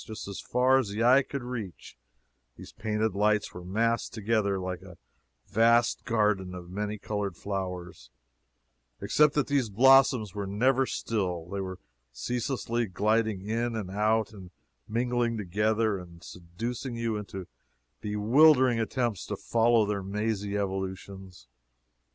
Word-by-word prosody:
Just 110 Hz, -2 st, -8 dB
as 100 Hz, -, -6 dB
far 130 Hz, +2 st, +3 dB
as 120 Hz, -6 st, -2 dB
the 105 Hz, +3 st, -2 dB
eye 130 Hz, +3 st, +6 dB
could 140 Hz, -1 st, -6 dB
reach, 115 Hz, -7 st, -7 dB, 0.6 s
these -, -, -12 dB
painted 110 Hz, 0 st, -1 dB
lights 105 Hz, +1 st, +1 dB
were 90 Hz, -, -8 dB
massed 115 Hz, +5 st, 0 dB
together 105 Hz, -2 st, 0 dB
like 90 Hz, -1 st, -4 dB
a -, -, -13 dB, 0.5 s
vast 115 Hz, +2 st, +3 dB
garden 105 Hz, -5 st, +1 dB
of 90 Hz, -1 st, -9 dB
many 105 Hz, +2 st, -3 dB
colored 100 Hz, -3 st, -4 dB
flowers, 90 Hz, -9 st, -5 dB, 0.9 s
except 150 Hz, -1 st, +3 dB
that 145 Hz, -, +2 dB
these 140 Hz, -5 st, 0 dB
blossoms 130 Hz, -1 st, +5 dB
were 100 Hz, -1 st, -4 dB
never 130 Hz, +6 st, +2 dB
still; 90 Hz, -7 st, -2 dB
they 100 Hz, +1 st, -3 dB
were 95 Hz, -1 st, -5 dB, 0.3 s
ceaselessly 120 Hz, -, -2 dB
gliding 105 Hz, +1 st, 0 dB
in 115 Hz, +2 st, -1 dB
and 100 Hz, -4 st, -4 dB
out, 110 Hz, +2 st, +1 dB
and 95 Hz, -3 st, -11 dB, 0.4 s
mingling 120 Hz, 0 st, 0 dB
together, 105 Hz, +2 st, 0 dB
and 85 Hz, -1 st, -13 dB
seducing 115 Hz, +10 st, -6 dB
you 115 Hz, -1 st, -1 dB
into 100 Hz, -3 st, -6 dB, 0.5 s
bewildering 125 Hz, +4 st, +4 dB
attempts 115 Hz, -3 st, -1 dB
to -, -, -4 dB
follow 115 Hz, -1 st, +3 dB
their 100 Hz, -1 st, -2 dB
mazy 105 Hz, +1 st, -2 dB
evolutions. 95 Hz, -4 st, -5 dB
105 Hz, 135 wpm, -28 LUFS, 95-115 Hz, 0.9 s, eye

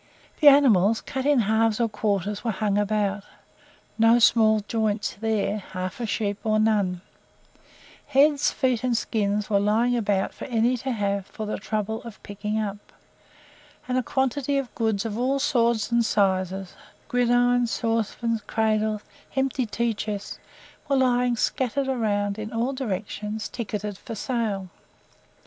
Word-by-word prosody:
The 300 Hz, -, +5 dB
animals, 230 Hz, -7 st, +6 dB
cut 265 Hz, +1 st, -4 dB
into 285 Hz, -5 st, +4 dB
halves 220 Hz, +1 st, +2 dB
or 235 Hz, -, +2 dB
quarters, 205 Hz, -2 st, -2 dB
were 235 Hz, -, -1 dB
hung 205 Hz, -1 st, 0 dB
round; 205 Hz, -1 st, -1 dB, 0.8 s
no 225 Hz, +1 st, +6 dB
small 220 Hz, -2 st, +4 dB
joints 215 Hz, -2 st, -1 dB
there 215 Hz, -1 st, 0 dB
half 185 Hz, +1 st, -6 dB
a 235 Hz, -, -2 dB
sheep 205 Hz, -2 st, -2 dB
or 215 Hz, -1 st, +2 dB
none; 205 Hz, -5 st, +1 dB, 1.1 s
heads, 285 Hz, +1 st, +4 dB
feet, 255 Hz, -3 st, 0 dB
and 245 Hz, -2 st, +1 dB
skins 210 Hz, -2 st, -1 dB
were 200 Hz, -2 st, +2 dB
lying 225 Hz, +4 st, +2 dB
about 205 Hz, -4 st, 0 dB
for -, -, -8 dB
any 235 Hz, -2 st, +2 dB
one 255 Hz, -, 0 dB
to 265 Hz, +3 st, -3 dB
have 200 Hz, -2 st, -1 dB
for 215 Hz, +2 st, -6 dB
the 210 Hz, -, -3 dB
trouble 215 Hz, +1 st, -3 dB
of 230 Hz, -3 st, -11 dB
picking 210 Hz, +1 st, -3 dB
up, 205 Hz, -1 st, -3 dB, 1.1 s
and 250 Hz, -, -1 dB
a 255 Hz, -, +2 dB
quantity 265 Hz, +2 st, 0 dB
of 270 Hz, -3 st, -3 dB
goods 220 Hz, -3 st, -1 dB
of 220 Hz, 0 st, -3 dB
all 265 Hz, +3 st, +1 dB
sorts 235 Hz, -5 st, +1 dB
and 235 Hz, 0 st, +3 dB
sizes, 190 Hz, -3 st, 0 dB, 0.3 s
gridirons, 245 Hz, 0 st, +2 dB
saucepans, 230 Hz, 0 st, -1 dB
cradles, 215 Hz, -1 st, 0 dB, 0.3 s
empty 265 Hz, -2 st, 0 dB
tea 235 Hz, +2 st, -1 dB
chests, 210 Hz, -1 st, -5 dB, 0.5 s
were 275 Hz, -, +3 dB
lying 250 Hz, -1 st, +2 dB
scattered 265 Hz, +3 st, -1 dB
around 205 Hz, -5 st, -1 dB
in 215 Hz, 0 st, -5 dB
all 235 Hz, +4 st, -1 dB
directions 210 Hz, -3 st, -4 dB
ticketed 210 Hz, -4 st, -5 dB
"for 230 Hz, -, -7 dB
sale." 215 Hz, -5 st, -2 dB
220 Hz, 150 wpm, -25 LUFS, 205-245 Hz, 1.1 s, animals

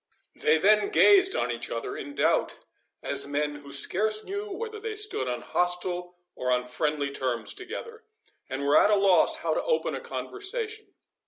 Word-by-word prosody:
They 155 Hz, +1 st, +3 dB
then 210 Hz, -, +4 dB
gazed 390 Hz, -2 st, +6 dB
on 125 Hz, -, 0 dB
each 120 Hz, 0 st, -3 dB
other 115 Hz, -, -4 dB
in 145 Hz, -, -8 dB
doubt, -, -, +1 dB, 0.5 s
as -, -, -1 dB
men 145 Hz, +1 st, -2 dB
who 145 Hz, -1 st, -12 dB
scarce 215 Hz, +9 st, +1 dB
knew 410 Hz, +2 st, -5 dB
whether 435 Hz, +2 st, -6 dB
they 440 Hz, 0 st, -5 dB
stood 420 Hz, -, 0 dB
on 125 Hz, -1 st, -3 dB
hostile 180 Hz, 0 st, -1 dB, 0.2 s
or 125 Hz, -, -4 dB
on 125 Hz, 0 st, +1 dB
friendly 145 Hz, +2 st, -2 dB
terms 125 Hz, -4 st, -2 dB
together, 450 Hz, +5 st, -8 dB, 0.5 s
and 135 Hz, +1 st, -4 dB
were 140 Hz, +1 st, +5 dB
at -, -, +4 dB
a 210 Hz, -, +5 dB
loss 195 Hz, -2 st, +4 dB
how -, -, +1 dB
to -, -, 0 dB
open 485 Hz, -1 st, 0 dB
a -, -, -4 dB
conversation. 435 Hz, +2 st, -5 dB
180 Hz, 175 wpm, -27 LUFS, -, 0.5 s, gazed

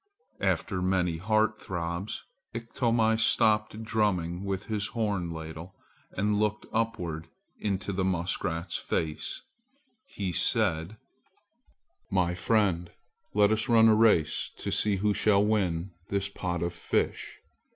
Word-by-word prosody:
After 95 Hz, -3 st, 0 dB
many 90 Hz, -2 st, +1 dB
heart 110 Hz, +4 st, +1 dB
throbs 85 Hz, +2 st, -4 dB, 0.3 s
Iktomi 115 Hz, -1 st, +1 dB
stopped 110 Hz, 0 st, +2 dB
drumming 95 Hz, -5 st, 0 dB
with 100 Hz, 0 st, -3 dB
his 105 Hz, -1 st, -1 dB
horn 105 Hz, -6 st, -1 dB
ladle, 80 Hz, +3 st, -8 dB, 0.4 s
and 105 Hz, +2 st, +1 dB
looking 105 Hz, 0 st, -1 dB
upward 90 Hz, -9 st, -2 dB, 0.3 s
into 100 Hz, -1 st, -2 dB
the 95 Hz, 0 st, 0 dB
muskrat's 85 Hz, -2 st, -1 dB
face, 80 Hz, -1 st, -3 dB, 0.6 s
he 100 Hz, -, -3 dB
said: 95 Hz, -2 st, +1 dB, 1.1 s
"My 90 Hz, -2 st, +1 dB
friend, 90 Hz, -2 st, +1 dB, 0.4 s
let 105 Hz, 0 st, +5 dB
us 110 Hz, +4 st, 0 dB
run 115 Hz, -1 st, +7 dB
a -, -, +6 dB
race 105 Hz, -8 st, +3 dB
to -, -, -3 dB
see 105 Hz, -2 st, +2 dB
who 105 Hz, +2 st, +1 dB
shall 100 Hz, 0 st, +3 dB
win 95 Hz, -4 st, 0 dB, 0.2 s
this 100 Hz, 0 st, 0 dB
pot 90 Hz, -3 st, -3 dB
of 85 Hz, 0 st, -2 dB
fish. -, -, -2 dB
100 Hz, 120 wpm, -28 LUFS, 85-110 Hz, 1.1 s, run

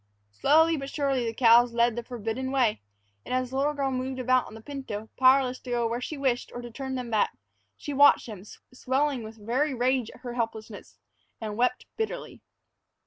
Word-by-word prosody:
Slowly, 320 Hz, -, +4 dB
but 275 Hz, -1 st, -5 dB
surely, 275 Hz, -5 st, 0 dB
the 225 Hz, -, -2 dB
cows 235 Hz, 0 st, +5 dB
led 235 Hz, -1 st, +3 dB
the 240 Hz, -, -3 dB
forbidden 240 Hz, +2 st, -4 dB
way, 250 Hz, -, +1 dB, 0.4 s
and -, -, -3 dB
as 255 Hz, -1 st, -1 dB
the 265 Hz, -, -3 dB
little 290 Hz, +2 st, +1 dB
girl 275 Hz, -1 st, -1 dB
moved 260 Hz, 0 st, -3 dB
about 255 Hz, 0 st, +2 dB
on -, -, -11 dB
the 225 Hz, -, -10 dB
pinto, 220 Hz, -5 st, -6 dB
powerless 260 Hz, -1 st, +4 dB
to 255 Hz, -, -11 dB
go 240 Hz, -1 st, 0 dB
where 235 Hz, +2 st, -3 dB
she 305 Hz, +4 st, -5 dB
wished 260 Hz, -3 st, -1 dB
or -, -, -4 dB
to 240 Hz, -, -8 dB
turn 265 Hz, +2 st, -5 dB
them 250 Hz, -2 st, -5 dB
back, 215 Hz, -, +1 dB, 0.4 s
she 290 Hz, -, -6 dB
watched 285 Hz, +1 st, +6 dB
them, 210 Hz, -6 st, -8 dB, 0.3 s
swelling 265 Hz, +1 st, 0 dB
with 220 Hz, 0 st, -9 dB
very 265 Hz, +5 st, 0 dB
rage 250 Hz, -1 st, +1 dB
in -, -, -15 dB
her 245 Hz, -2 st, -6 dB
helplessness, 225 Hz, -3 st, -5 dB, 0.4 s
and 215 Hz, -2 st, -5 dB
wept 250 Hz, +2 st, 0 dB
bitterly. 445 Hz, -1 st, -4 dB
255 Hz, 195 wpm, -27 LUFS, 235-270 Hz, 0.4 s, watched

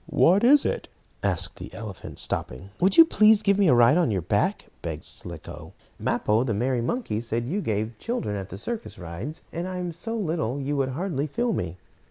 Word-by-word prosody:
What 190 Hz, +6 st, +4 dB
is 280 Hz, +4 st, +6 dB
it?" -, -, -2 dB, 0.3 s
asked -, -, +1 dB
the -, -, -8 dB
elephant, 105 Hz, -4 st, -8 dB
stopping. 95 Hz, +11 st, -3 dB
"Would 190 Hz, +2 st, +3 dB
you 330 Hz, -, +11 dB
please 215 Hz, -7 st, +5 dB
give 200 Hz, -1 st, +3 dB
me 200 Hz, -, +5 dB
a 125 Hz, -, +6 dB
ride 120 Hz, +6 st, +6 dB
on 175 Hz, -7 st, +3 dB
your 95 Hz, -5 st, -1 dB
back," 90 Hz, -, 0 dB, 0.2 s
begged -, -, -5 dB
Slicko. -, -, -8 dB, 0.3 s
"Mappo, 110 Hz, +3 st, +1 dB
the 115 Hz, -5 st, -1 dB
merry 125 Hz, +3 st, 0 dB
monkey, 120 Hz, -, -2 dB
said 120 Hz, 0 st, -2 dB
you 195 Hz, +9 st, -1 dB
gave 110 Hz, -, -2 dB
children 230 Hz, -, -2 dB
at 95 Hz, -1 st, -5 dB
the 95 Hz, -, -7 dB
circus 230 Hz, -, -5 dB
rides, 95 Hz, -, -7 dB
and 170 Hz, +2 st, -3 dB
I 185 Hz, 0 st, -4 dB
am 180 Hz, -1 st, -3 dB
so 225 Hz, +8 st, -4 dB
little 160 Hz, -, -1 dB
you 140 Hz, +1 st, -2 dB
would 135 Hz, -2 st, 0 dB
hardly 150 Hz, 0 st, -2 dB
feel 235 Hz, -, -1 dB
me." 90 Hz, -, -3 dB
140 Hz, 205 wpm, -25 LUFS, -, 0.3 s, you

